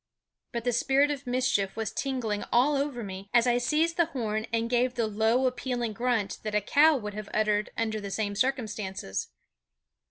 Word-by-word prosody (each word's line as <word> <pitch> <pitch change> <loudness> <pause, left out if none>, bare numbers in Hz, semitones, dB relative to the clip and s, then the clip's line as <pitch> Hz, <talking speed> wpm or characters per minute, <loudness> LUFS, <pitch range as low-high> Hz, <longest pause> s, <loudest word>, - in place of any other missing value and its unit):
But 235 -1 -3
the 245 - +1
spirit 270 +4 +3
of 280 -3 -5
mischief 245 -6 +1
was 225 -2 -2
tingling 240 -7 -2
all 270 +5 +4
over 275 -4 -2
me 195 0 -7
as 235 0 +6
I 245 -1 +3
seized 310 +7 +1
the 340 -2 +3
horn 220 -7 -3
and 230 0 0
gave 245 +1 +1
the 235 -2 +1
low 220 +4 +2
appealing 250 -2 -1
grunt 230 -3 -1
that 215 -1 -3
a - - +5
cow 295 +8 +5
would 210 -4 -5
have 210 0 -7
uttered 215 -1 +1
under 220 -1 -1
the 200 - -5
same 205 0 -2
circumstances. 210 - -2
235 Hz, 185 wpm, -28 LUFS, 210-255 Hz, -, as